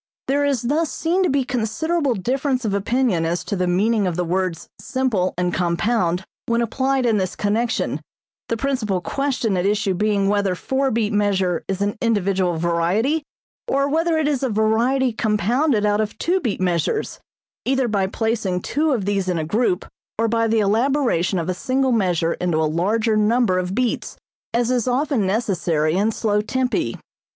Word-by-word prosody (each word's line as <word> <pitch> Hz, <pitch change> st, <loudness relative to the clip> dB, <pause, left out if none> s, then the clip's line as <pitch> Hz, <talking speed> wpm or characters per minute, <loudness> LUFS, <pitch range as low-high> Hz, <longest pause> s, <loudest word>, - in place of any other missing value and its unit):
There 280 Hz, +2 st, +2 dB
is 275 Hz, -5 st, 0 dB
thus 300 Hz, +6 st, 0 dB
seen 345 Hz, +3 st, 0 dB
to 365 Hz, -, +2 dB
be 275 Hz, -1 st, +2 dB
considerable 255 Hz, +5 st, -1 dB
difference 255 Hz, +5 st, -1 dB
of 205 Hz, -, 0 dB
opinion 210 Hz, -2 st, +1 dB
as 170 Hz, +2 st, -1 dB
to 205 Hz, -, -3 dB
the 180 Hz, -1 st, 0 dB
meaning 205 Hz, +3 st, +2 dB
of 175 Hz, -, -2 dB
the 180 Hz, -, 0 dB
words 180 Hz, -1 st, -2 dB
simple 215 Hz, -4 st, -1 dB
and 180 Hz, -1 st, 0 dB
compound 175 Hz, +1 st, 0 dB, 0.2 s
when 235 Hz, 0 st, +1 dB
applied 265 Hz, +2 st, 0 dB
in 225 Hz, -3 st, +3 dB
this 185 Hz, -2 st, -2 dB
connection, 225 Hz, +3 st, -1 dB, 0.5 s
the 230 Hz, -, 0 dB
principal 230 Hz, -7 st, -1 dB
question 255 Hz, -1 st, -1 dB
at 180 Hz, -, 0 dB
issue 205 Hz, -2 st, +1 dB
being 200 Hz, +1 st, +1 dB
whether 200 Hz, -2 st, +1 dB
four 265 Hz, +8 st, 0 dB
beat 220 Hz, -3 st, 0 dB
measure 195 Hz, -4 st, +1 dB
is 195 Hz, 0 st, -3 dB
an 205 Hz, +3 st, -2 dB
individual 195 Hz, -6 st, +1 dB
variety, 175 Hz, -, +1 dB, 0.5 s
or 275 Hz, +1 st, +1 dB
whether 325 Hz, +3 st, +1 dB
it 310 Hz, -2 st, +1 dB
is 285 Hz, -4 st, 0 dB
a 265 Hz, -, 0 dB
variety 230 Hz, +4 st, +2 dB
compounded 220 Hz, -, +1 dB
out 205 Hz, +1 st, +2 dB
of 215 Hz, 0 st, -4 dB
two 365 Hz, +3 st, +1 dB
beat 235 Hz, -, -2 dB
measures, 180 Hz, -, -1 dB, 0.4 s
either 265 Hz, -1 st, +1 dB
by 200 Hz, -4 st, 0 dB
placing 205 Hz, -4 st, -1 dB
two 305 Hz, 0 st, +1 dB
of 215 Hz, -7 st, -1 dB
these 195 Hz, -2 st, 0 dB
in 180 Hz, -, 0 dB
a 160 Hz, -, -1 dB
group 200 Hz, +1 st, 0 dB, 0.3 s
or 230 Hz, +1 st, +1 dB
by 230 Hz, 0 st, +1 dB
the 225 Hz, 0 st, +2 dB
elaboration 220 Hz, -, +1 dB
of 170 Hz, -1 st, -2 dB
a 185 Hz, -, 0 dB
single 260 Hz, +8 st, 0 dB
measure 180 Hz, -7 st, +1 dB
into 175 Hz, -3 st, -1 dB
a 160 Hz, -, +2 dB
larger 210 Hz, +8 st, +1 dB
number 215 Hz, -2 st, +2 dB
of 180 Hz, +1 st, -3 dB
beats, 250 Hz, -1 st, -1 dB, 0.3 s
as 240 Hz, +1 st, +1 dB
is 245 Hz, -2 st, 0 dB
often 255 Hz, -4 st, +1 dB
necessary 175 Hz, -7 st, 0 dB
in 205 Hz, +4 st, +2 dB
slow 210 Hz, -1 st, 0 dB
tempi. 245 Hz, -, -1 dB
215 Hz, 180 wpm, -21 LUFS, 185-255 Hz, 0.5 s, in